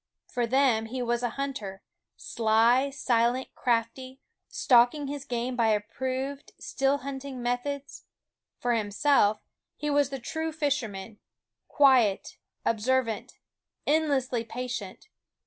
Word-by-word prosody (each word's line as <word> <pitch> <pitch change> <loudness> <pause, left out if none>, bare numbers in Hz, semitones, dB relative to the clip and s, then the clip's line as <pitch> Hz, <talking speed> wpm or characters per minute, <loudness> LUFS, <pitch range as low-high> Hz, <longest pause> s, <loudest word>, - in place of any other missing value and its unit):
For 245 -1 -2
them 245 -3 +2
he 250 +2 -3
was 240 0 0
a 245 - 0
hunter, 240 -9 -4 0.3
sly, 230 +4 +2
silent, 245 -2 +1
crafty, 250 +2 -1 0.3
stalking 245 +4 +4
his 280 0 -5
game 245 +1 -2
by 230 -2 +2
approved 260 +6 -2
still 275 +1 0
hunting 270 -1 -6
methods; 245 +4 -3 0.5
for 245 0 0
himself 210 0 +2 0.3
he 295 0 -2
was 285 -2 +3
the 275 - -4
true 320 +6 -4
fisherman, 230 -10 -3 0.5
quiet, 255 -9 +3 0.3
observant, 230 0 0 0.5
endlessly 275 -6 +1
patient. 235 - -6
250 Hz, 110 wpm, -28 LUFS, 230-275 Hz, 0.5 s, stalking